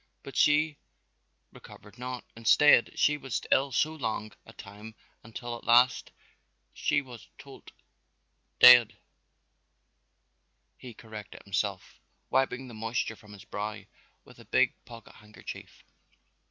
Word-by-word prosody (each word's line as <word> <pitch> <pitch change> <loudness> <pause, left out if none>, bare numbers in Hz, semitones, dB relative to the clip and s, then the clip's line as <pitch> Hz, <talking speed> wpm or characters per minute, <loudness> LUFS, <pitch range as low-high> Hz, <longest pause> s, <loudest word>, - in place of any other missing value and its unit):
But - - -11
she 150 0 +2 0.8
recovered 105 +3 -15
not; 125 0 -6
instead 115 +2 +4
she 150 0 +2
was 135 -5 -4
ill 135 +1 +2
so 155 +5 0
long 110 -7 -4 0.2
a 115 - -14
time 105 +2 -12 0.3
until 120 +2 -7
at - - -12
last 120 +2 +3 0.6
she - - 0
was 125 -3 -13
todt, - - -14 0.9
dead," 120 -3 +8 1.8
he 120 -3 -11
corrected 105 -4 -11
himself, 100 -1 -4 0.3
wiping 130 0 0
the 120 - -11
moisture 110 +1 -3
from 105 -1 -16
his 100 - -14
brow 105 0 -6 0.4
with - - -18
a - - -15
big - - +2
pocket 115 -1 -13
handkerchief. 105 -1 -12
115 Hz, 120 wpm, -28 LUFS, 105-125 Hz, 1.8 s, dead